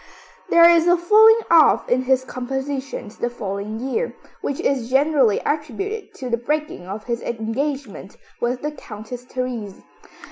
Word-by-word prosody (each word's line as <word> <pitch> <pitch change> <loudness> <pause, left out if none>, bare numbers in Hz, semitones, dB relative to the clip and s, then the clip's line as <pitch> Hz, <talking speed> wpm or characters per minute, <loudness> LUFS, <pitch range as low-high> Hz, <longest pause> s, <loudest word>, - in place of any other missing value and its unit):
There 335 0 +7
is 340 0 +5
a 350 0 +5
falling 440 +6 +6
off 325 -3 +5
in 250 +1 +2
his 260 0 +1
compositions 265 -3 -5
the 240 - -1
following 210 -1 -5
year, 270 - -2 0.3
which 280 - -3
is 255 -4 -1
generally 270 -5 +3
attributed 315 - -3
to 260 - -6
the 235 -1 0
breaking 295 - -3
of 205 +3 -6
his 235 0 -3
engagement 235 -2 -4 0.2
with 245 +2 -2
the 300 - -2
Countess 240 -2 -9
Therese. 245 -6 -5
260 Hz, 145 wpm, -21 LUFS, 235-300 Hz, 0.3 s, There